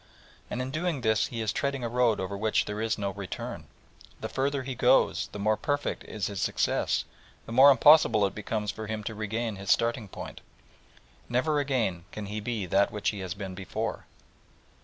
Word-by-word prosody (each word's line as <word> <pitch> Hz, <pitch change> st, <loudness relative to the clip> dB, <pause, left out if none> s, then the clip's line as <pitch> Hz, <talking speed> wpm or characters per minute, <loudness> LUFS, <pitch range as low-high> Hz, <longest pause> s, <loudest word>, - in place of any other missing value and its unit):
And 125 Hz, -, -2 dB
in 130 Hz, -, -5 dB
doing 160 Hz, -1 st, -1 dB
this 110 Hz, -2 st, +2 dB
he 115 Hz, -2 st, -5 dB
is 110 Hz, -2 st, -1 dB
treading 140 Hz, -2 st, -1 dB
a -, -, 0 dB
road 120 Hz, -2 st, +2 dB
over 95 Hz, +1 st, -3 dB
which 110 Hz, +2 st, +1 dB
there 105 Hz, +1 st, -4 dB
is 110 Hz, 0 st, 0 dB
no 100 Hz, -2 st, -2 dB
return. 100 Hz, -2 st, -6 dB, 0.5 s
The -, -, -4 dB
further 140 Hz, 0 st, -1 dB
he 130 Hz, 0 st, -4 dB
goes, 120 Hz, -, +3 dB
the -, -, -7 dB
more 105 Hz, +2 st, +2 dB
perfect 145 Hz, 0 st, -2 dB
is 105 Hz, -3 st, -4 dB
his 100 Hz, -3 st, -3 dB
success, -, -, +1 dB, 0.4 s
the -, -, -9 dB
more 130 Hz, +4 st, +8 dB
impossible 140 Hz, -6 st, +6 dB
it 100 Hz, -, -2 dB
becomes 105 Hz, 0 st, -2 dB
for 110 Hz, +1 st, -7 dB
him 110 Hz, 0 st, -4 dB
to 110 Hz, -, -4 dB
regain 110 Hz, 0 st, -3 dB
his 100 Hz, 0 st, -7 dB
starting 115 Hz, -2 st, +2 dB
point. -, -, -8 dB, 0.9 s
Never 145 Hz, +5 st, +1 dB
again 115 Hz, -12 st, -1 dB
can 105 Hz, -, -6 dB
he 105 Hz, +2 st, -4 dB
be 110 Hz, -2 st, -3 dB
that 95 Hz, +3 st, +3 dB
which 105 Hz, -, -1 dB
he 105 Hz, -, -5 dB
has 95 Hz, -1 st, -4 dB
been 100 Hz, -2 st, -6 dB
before. 95 Hz, 0 st, -4 dB
110 Hz, 195 wpm, -28 LUFS, 100-125 Hz, 0.9 s, more